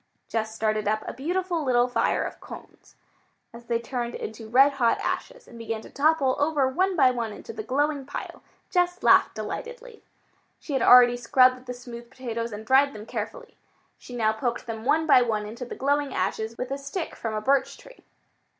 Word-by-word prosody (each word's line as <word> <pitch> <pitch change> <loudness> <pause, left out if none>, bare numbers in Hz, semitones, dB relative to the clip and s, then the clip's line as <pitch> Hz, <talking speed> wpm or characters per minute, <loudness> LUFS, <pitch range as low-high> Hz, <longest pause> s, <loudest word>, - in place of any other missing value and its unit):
Jess 220 -1 -3
started 215 -1 -1
up 215 +1 -1
a - - -4
beautiful 345 +5 -2
little 245 -2 +3
fire 245 - 0
of - - -7
cones. - - -13 0.6
As 235 0 -12
they 235 0 0
turned 240 0 -4
into 220 0 -7
red 270 +4 +6
hot 245 -4 +1
ashes - - -4
and 235 - -13
began 225 -1 -4
to - - -14
topple 285 -2 +2
over 290 -2 +2
one 370 +8 0
by 265 -6 +5
one 235 -3 -3
into 460 - -9
the 435 - -5
glowing 290 -5 -1
pile, - - -7 0.3
Jess 355 0 0
laughed - - +5
delightedly. 485 -1 -7 0.6
She 295 - -7
had 265 - +1
already 245 -1 +7
scrubbed 255 +1 +3
the 250 - -5
smooth 240 -1 -10
potatoes 235 -3 -5
and 210 +1 -8
dried 270 +3 +4
them 210 0 -9
carefully. - - -7 0.4
She 245 - -10
now 220 -2 +1
poked 240 +2 -3
them 225 -1 -6
one 315 +4 +2
by 280 -5 +6
one 220 -3 -1
into 235 +4 -7
the - - -8
glowing 285 0 0
ashes 220 +5 -2
with 255 - -5
a 275 - -3
stick 280 +5 -5
from 225 -2 -4
a - - 0
birch 275 +4 +1
tree. - - -17
255 Hz, 195 wpm, -25 LUFS, 230-290 Hz, 0.6 s, already